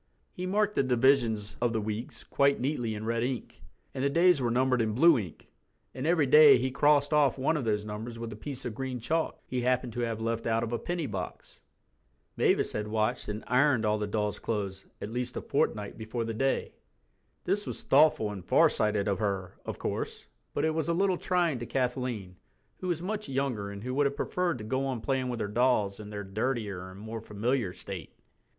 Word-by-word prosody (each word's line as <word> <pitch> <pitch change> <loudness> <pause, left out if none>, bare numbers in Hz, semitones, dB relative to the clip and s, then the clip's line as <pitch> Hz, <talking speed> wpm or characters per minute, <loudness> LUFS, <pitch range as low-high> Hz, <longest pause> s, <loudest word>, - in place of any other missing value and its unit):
He 180 +1 -4
marked 210 +2 +1
the - - +2
divisions 125 -5 +2
of 120 -1 +2
the 110 - +1
weeks 110 +2 -5
quite 140 0 +2
neatly 120 -5 -1
in 105 +1 -5
red 115 0 0
ink, 125 -1 -4 0.3
and 130 - -3
the 140 - +3
days 170 0 +4
were 120 - +1
numbered 125 +1 +2
in 110 -1 0
blue 165 +7 +7
ink, 90 -7 -8 0.5
and 130 +4 -3
every 165 -3 +3
day 145 0 +8
he 130 +2 -1
crossed 145 +1 +3
off 145 -4 +4
one 135 +5 +1
of 145 -5 -2
those 105 -1 0
numbers 110 +3 -6
with 115 -1 -5
a - - -8
piece 130 +5 -7
of 120 - -3
green 130 +1 -4
chalk 160 +7 -1
he 125 -1 -2
happened 125 -1 0
to 120 - -4
have 115 -2 -1
left 115 0 -2
out 115 0 +1
of 120 0 -3
a 120 - 0
penny 175 -2 -2
box. 95 -7 -6 0.7
Mavis - - +2
had 105 0 -3
washed 110 0 -1
and 105 +1 -4
ironed 125 -2 +3
all 105 0 +1
the 105 - -2
dolls' 105 0 -1
clothes 100 -4 -3
at 105 - -6
least 125 +1 -3
a - - -2
fortnight 105 +1 -1
before 110 +1 -3
The 115 - -3
Day. 135 +4 0 0.7
This 205 +3 -1
was - - -6
thoughtful 135 -7 +4
and 95 -3 -7
farsighted 105 +2 +3
of 100 0 0
her, 95 -3 -2
of - - -4
course, - - -4 0.3
but 145 - +1
it 160 - +1
was 160 0 -1
a - - +3
little 190 0 +2
trying 175 -7 +1
to 120 - -5
Kathleen, 125 -7 -2 0.4
who 185 - -4
was 175 -1 -1
much 210 +2 -3
younger 130 -7 -1
and 100 0 -8
who 125 +1 -3
would 145 +1 +3
have 140 - -4
preferred 175 +1 -1
to 110 - -8
go 130 +5 -1
on 130 -3 -2
playing 130 0 -1
with 120 -1 -3
her 105 - -1
dolls 105 -3 +1
in 105 -1 -8
their 105 -1 -5
dirtier 100 -2 -3
and 95 +1 -11
more 110 +1 -6
familiar 110 0 -1
state. 90 -2 -8
120 Hz, 215 wpm, -29 LUFS, 105-140 Hz, 0.7 s, day